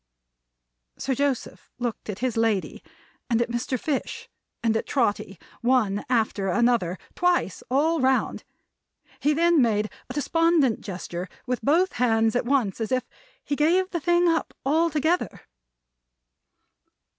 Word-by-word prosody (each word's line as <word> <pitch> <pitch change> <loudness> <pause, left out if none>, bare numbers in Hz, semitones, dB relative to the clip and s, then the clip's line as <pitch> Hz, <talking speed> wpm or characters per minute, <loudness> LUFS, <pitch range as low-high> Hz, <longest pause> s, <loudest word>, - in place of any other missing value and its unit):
Sir 265 - -1
Joseph 275 -1 -2
looked 240 -3 -4
at 200 - -3
his 250 - -1
lady, 225 -4 0 0.5
and 230 -2 +2
at 235 0 0
Mr. 240 +1 -2
Fish, 285 0 -3 0.4
and 225 -1 +2
at 225 - -1
Trotty, 205 -7 0 0.2
one 235 -5 +2
after 220 -5 +1
another, 210 -4 +2 0.2
twice 355 - +1
all 310 +5 +2
round. 260 0 +1 0.8
He 295 - +2
then 340 -1 +4
made 215 -3 +1 0.2
a - - -5
despondent 320 -4 +2
gesture 180 -2 -6 0.2
with 250 -1 -2
both 345 +7 +2
hands 225 -2 +3
at 245 - +1
once, 240 -6 +1
as 225 - -2
if 255 -1 +1 0.4
he 285 - -2
gave 355 +6 +2
the 345 - -1
thing 345 +2 +3
up 330 -1 0
altogether. 320 +3 +1
255 Hz, 135 wpm, -25 LUFS, 225-310 Hz, 0.8 s, then